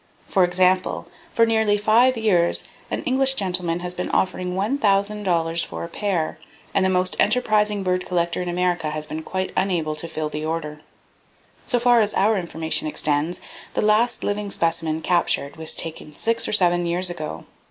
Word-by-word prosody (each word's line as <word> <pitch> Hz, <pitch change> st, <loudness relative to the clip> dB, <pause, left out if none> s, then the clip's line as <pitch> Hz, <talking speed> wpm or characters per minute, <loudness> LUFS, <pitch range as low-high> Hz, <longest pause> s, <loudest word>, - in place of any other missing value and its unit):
For 190 Hz, -, +3 dB
example, 185 Hz, +1 st, +2 dB, 0.3 s
for 230 Hz, -, +4 dB
nearly 220 Hz, -2 st, +2 dB
five 230 Hz, +5 st, +4 dB
years 185 Hz, -6 st, +2 dB, 0.3 s
an -, -, -3 dB
English 265 Hz, +1 st, +2 dB
[Page -, -, -2 dB
19] 185 Hz, -2 st, -2 dB
gentlemen 175 Hz, -2 st, 0 dB
has 180 Hz, 0 st, -4 dB
been 180 Hz, -, -4 dB
offering 180 Hz, -1 st, -1 dB
$1,000 195 Hz, -6 st, +1 dB
for -, -, -6 dB
a -, -, -4 dB
pair, 180 Hz, -4 st, -2 dB, 0.3 s
and 195 Hz, -, +2 dB
the 190 Hz, -, +3 dB
most 185 Hz, 0 st, +2 dB
enterprising 210 Hz, -4 st, +2 dB
bird 180 Hz, 0 st, -1 dB
collector 170 Hz, -1 st, 0 dB
in 180 Hz, -, -3 dB
America 175 Hz, -2 st, 0 dB
has 155 Hz, 0 st, -4 dB
been 155 Hz, +1 st, -5 dB
quite 185 Hz, +3 st, -3 dB
unable 170 Hz, -5 st, 0 dB
to 170 Hz, -, -4 dB
fill 155 Hz, -2 st, -3 dB
the 150 Hz, 0 st, -5 dB
order. 155 Hz, -1 st, -4 dB, 0.9 s
So 245 Hz, -, +2 dB
far 240 Hz, -1 st, +4 dB
as 210 Hz, -1 st, 0 dB
our 215 Hz, +3 st, +3 dB
information 160 Hz, -4 st, -2 dB
extends, 150 Hz, +2 st, 0 dB, 0.3 s
the -, -, +1 dB
last 215 Hz, +3 st, +2 dB
living 205 Hz, 0 st, -2 dB
specimen 165 Hz, -3 st, 0 dB
captured 170 Hz, -5 st, +1 dB
was 160 Hz, 0 st, -3 dB
taken 155 Hz, -2 st, -5 dB
six 230 Hz, +6 st, 0 dB
or -, -, -2 dB
seven 175 Hz, -3 st, +3 dB
years 180 Hz, +1 st, 0 dB
ago. 155 Hz, -3 st, -6 dB
180 Hz, 175 wpm, -22 LUFS, 165-210 Hz, 0.9 s, for